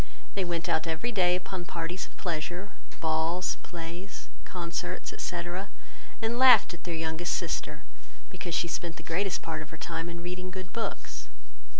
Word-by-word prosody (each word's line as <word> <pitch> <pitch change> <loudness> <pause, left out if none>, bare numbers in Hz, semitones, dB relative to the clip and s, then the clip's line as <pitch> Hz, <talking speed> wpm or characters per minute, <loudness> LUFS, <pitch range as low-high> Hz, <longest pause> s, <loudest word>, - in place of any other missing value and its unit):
They 195 - +1
went 175 0 0
out 165 -1 +3
every 165 +9 0
day 180 -4 +5
upon 180 0 -3
parties 170 +2 -2
of - - -21
pleasure, 175 +3 -2 0.3
balls, 160 +3 +2
plays, 170 +3 -6 0.2
concerts, 175 0 -2
etc. 175 +3 -2 0.5
and 230 +2 +1
laughed 255 -7 +9
at 175 - -9
their 170 -2 -1
youngest 160 +2 0
sister, - - -1 0.5
because 175 -2 -2
she 170 - +3
spent 170 0 -2
the - - -9
greatest 185 +3 +1
part 160 -1 -2
of 155 - -7
her 160 - -8
time 165 +1 -2
in 170 0 -5
reading 180 +1 -3
good 185 -1 -6
books. 230 - -3
175 Hz, 165 wpm, -31 LUFS, 165-185 Hz, 0.5 s, laughed